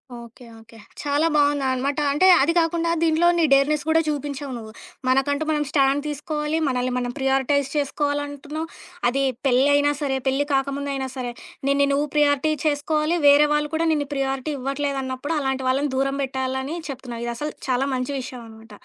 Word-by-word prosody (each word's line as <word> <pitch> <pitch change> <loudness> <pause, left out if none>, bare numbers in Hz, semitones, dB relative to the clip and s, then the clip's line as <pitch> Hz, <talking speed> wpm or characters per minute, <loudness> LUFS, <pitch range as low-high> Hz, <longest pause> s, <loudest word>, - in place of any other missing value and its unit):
Okay. 235 +1 -12
Okay. 225 +1 -17 0.2
చాలా 290 +2 +1
బావుందనమాట. 280 -1 +1
అంటే 335 +7 +3
అది 310 +5 +2
కాకుండా 335 0 0
దీంట్లో 330 +1 +3
నీ 335 - +3
డేర్నెస్ 285 +2 +3
కూడా 325 0 +4
చూపించావు 285 -2 -3
నువ్వు. 220 -1 -9 0.4
మనకంటూ 270 +3 +2
మనం 300 -1 +1
స్టాండ్ 275 0 +3
తీసుకోవాలి. 300 +1 -2
మనల్ని 255 -1 0
మనం 245 -1 -2
ప్రియారిటైజ్ 270 +1 +1
చేసుకోవాలంటున్నావు. 290 +1 -2 0.4
అది 275 +2 0 0.2
పెళ్ళైనా 285 +3 +4
సరే, 270 -2 0
పెళ్లి 270 +2 +1
కాకముందైనా 275 0 -1
సరే 250 -2 -4 0.4
నిన్ని 280 0 +3
నువ్వు 290 +2 +1
ప్రియారిటీ 295 0 +3
చేసుకోవాలి. 305 +2 +1
వేరే 290 +1 +7
వాళ్ళు 295 0 +1
కూడా 330 +1 +1
నిన్నిు 290 -2 -1
ప్రియారిటీ 270 +1 -2
ఇవ్వట్లేదన్నప్పుడు 275 +1 -2
అలాంటి 265 -1 -2
వాళ్ళని 275 +2 +1
దూరం 275 +1 0
బెట్టాలని 265 +2 -3
చెప్తున్నావు. 245 -3 -6
ఇది 235 - -2
అసలు 300 +2 -3 0.2
చాలా 260 +2 +1
మంచి 255 +2 -3
విషయం 250 -1 -8
అనమాట. 220 0 -15
280 Hz, 155 wpm, -23 LUFS, 265-295 Hz, 0.4 s, వేరే